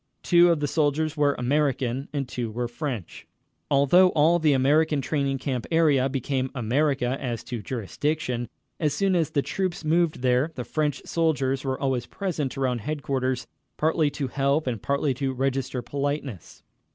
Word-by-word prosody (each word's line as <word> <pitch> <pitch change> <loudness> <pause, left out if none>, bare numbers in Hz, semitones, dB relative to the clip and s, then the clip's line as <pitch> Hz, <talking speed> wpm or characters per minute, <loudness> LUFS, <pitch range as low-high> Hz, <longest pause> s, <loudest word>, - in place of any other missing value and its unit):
Two 175 0 +6
of 165 - +1
the 145 - +1
soldiers 155 +1 0
were 145 -2 +2
American 135 -1 0
and 140 -3 -2
two 120 -2 -4
were 120 +2 -3
French. 120 - -6 0.4
Although 145 +6 +5
all 160 +3 +4
the 155 -2 +3
American 145 +3 +3
training 140 -1 -1
camp 130 -2 -3
area 150 -5 +3
became 130 0 -1
America 130 +1 0
as 120 -4 -3
to 120 -3 -5
jurisdiction, 125 +3 -2 0.3
as 150 -3 0
soon 195 -2 +2
as 165 -4 +1
the 140 - 0
troops 185 -3 -3
moved 160 -3 +1
there, 125 +5 +2
the 125 - -4
French 150 +1 -1
soldiers 140 -5 0
were 130 -1 -2
always 130 -3 -1
present 155 -9 -3
around 125 -3 0
headquarters, 135 -2 -2 0.3
partly 155 -1 +2
to 140 -1 -3
help 140 +4 +1
and 120 -5 -3
partly 140 0 0
to 135 +1 -2
register 130 -1 -1
politeness. 140 - -4
140 Hz, 160 wpm, -25 LUFS, 130-155 Hz, 0.4 s, Two